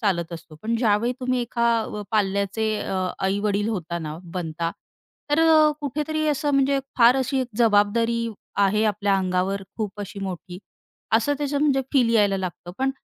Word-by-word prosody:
चालत 175 -6 0
असतो. 165 -1 -9
पण 230 +1 0
ज्यावेळी 225 +1 +2
तुम्ही 255 0 0
एका 235 0 0
अ, 210 -1 -5
पाल्याचे 205 +1 0
अ, - - -3 0.2
आई-वडील 205 +2 0
होता 170 -5 -3
ना, 155 0 -6 0.2
बनता. 165 -1 -2 0.6
तर 295 +2 +3
अ, 310 -1 +6
कुठेतरी 305 +2 -2
असं 295 0 0
म्हणजे 275 0 +3 0.2
फार 235 +2 +7
अशी 265 0 0
एक 255 - -3
जबाबदारी 230 +1 +3 0.4
आहे 210 +3 +1
आपल्या 205 -1 +1
अंगावर 190 +1 0
खूप 210 -2 -4
अशी 200 0 -7
मोठी 180 -1 -6 0.5
असं 235 +6 +3
त्याचं 290 -1 -1
म्हणजे 280 -2 +3
फील 245 -4 +4
यायला 205 -3 +3
लागतं. 175 -1 -6
पण 265 +1 +1
215 Hz, 160 wpm, -24 LUFS, 195-255 Hz, 0.6 s, फार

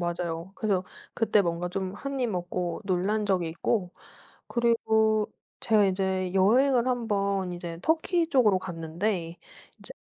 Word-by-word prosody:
맞아요. 175 +1 -3
그래서 195 -4 0 0.3
그때 215 -3 +3
뭔가 170 0 -2
좀 190 +1 -3
한 275 +4 -4
입 245 - +1
먹고 180 -1 -3
놀란 200 +3 0
적이 180 -4 +1
있고 180 +3 -1 0.6
그리고 220 -2 +2 0.3
제가 215 -3 +4
이제 190 -1 -1
여행을 245 +6 +4
1 245 -2 -1
번 195 -3 0
이제 170 -1 -6
터키 330 +1 +1
쪽으로 225 - +4
갔는데 170 +1 -3 0.4
이제 - - -11
195 Hz, 260 characters per minute, -27 LUFS, 175-225 Hz, 0.6 s, 제가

